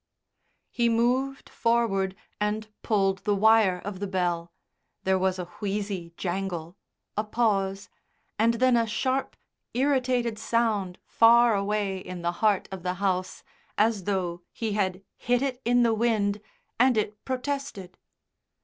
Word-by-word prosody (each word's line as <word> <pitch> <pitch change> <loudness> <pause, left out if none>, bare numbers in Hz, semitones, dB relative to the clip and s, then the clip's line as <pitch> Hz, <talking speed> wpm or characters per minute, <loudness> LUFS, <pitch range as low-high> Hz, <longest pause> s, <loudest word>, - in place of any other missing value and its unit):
He 235 -1 +2
moved 255 +4 +1
forward 210 -5 +1 0.2
and 210 +1 -1
pulled 195 -3 +1
the 205 +2 0
wire 215 -3 +4
of 200 -2 -5
the 200 - -3
bell; 175 -3 -1 0.5
there 190 0 +2
was 190 0 +1
a 180 - -4
wheezy 200 -4 -3
jangle, 175 -2 -3 0.4
a 210 - 0
pause, 200 -3 0 0.5
and 230 +1 +3
then 255 +1 +3
a 230 -1 +2
sharp 260 +5 -1 0.4
irritated 250 -4 +1
sound 215 -6 0
far 235 0 +5
away 200 -1 -1
in 180 -1 -8
the 170 - +1
heart 210 -3 +3
of 190 -1 -6
the 180 +1 -2
house, 185 -1 -2 0.3
as 210 -3 +2
though 180 -4 -1
he 225 -2 -3
had 195 -2 -1
hit 245 +1 +1
it 260 -2 -2
in 245 +1 +4
the 230 -1 +3
wind 215 -3 +1 0.4
and 250 -1 +4
it 210 0 -2
protested. 260 -8 -4
210 Hz, 140 wpm, -27 LUFS, 190-235 Hz, 0.5 s, far